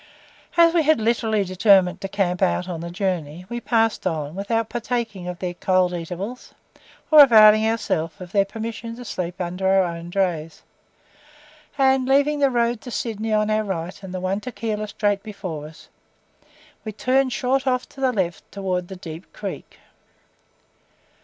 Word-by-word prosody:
As 335 -1 +6
we 340 - +4
literally 220 -3 +1
determined 185 -1 +3
to 195 - -3
"camp 190 -2 -1
out" 185 -1 +1
on 170 -3 -5
the 170 - -5
journey, 175 -3 -3
we 240 0 -4
passed 225 -4 +1
on, 155 -4 -3
without 220 +4 -1
partaking 230 -6 -3
of 180 -1 -5
their 180 0 -4
"cold 185 0 +1
eatables," 180 +8 -6 0.6
or 305 -1 +10
availing 215 -4 +7
ourselves 205 -6 -1
of 180 -2 -9
their 200 -1 +3
permission 230 +2 -6
to 245 +1 -10
sleep 180 -3 -5
under 180 +1 -2
our 190 0 +4
own 170 -1 -5
drays, 175 -4 -2 1.1
and, 265 -1 +3
leaving 285 +2 +3
the 280 -1 +4
road 235 -2 0
to 250 - -9
Sydney 225 -2 -3
on 215 0 +2
our 215 0 +1
right, 185 -1 -5
and 190 -2 -8
the 185 - -4
one 185 +2 -1
to 250 +4 -7
Keilor 215 -2 -3
straight 205 -1 0
before 185 -8 -6
us, 155 0 -15 1.0
we 215 - -5
turned 260 +4 +1
short 260 +4 0
off 255 -1 0
to 270 - -12
the 260 -1 +3
left 185 -7 -3
towards 185 -3 -2
the 190 - -8
Deep 165 -1 -10
Creek. - - -7
200 Hz, 165 wpm, -22 LUFS, 180-230 Hz, 1.1 s, or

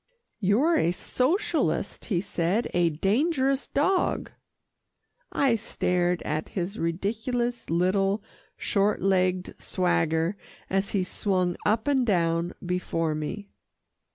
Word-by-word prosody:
"You're 230 - +3
a 165 - +2
socialist," 320 - 0
he 180 -6 0
said, 190 +3 -1
"a 175 -1 +3
dangerous 265 - +1
dog." 360 +7 +1 1.0
I 270 -4 +3
stared 180 -5 0
at 155 +1 -2
his 190 +4 -2
ridiculous, 225 +8 -2
little, 195 +4 +1 0.3
short 200 0 +1
legged 185 -1 +1
swagger, 170 0 +1 0.3
as 195 +1 0
he 195 -3 +2
swung 185 -1 0
up 220 +5 +1
and 275 -3 +3
down 170 -5 +1
before 165 -3 -1
me. 185 +7 -5
195 Hz, 105 wpm, -27 LUFS, 175-235 Hz, 1.0 s, You're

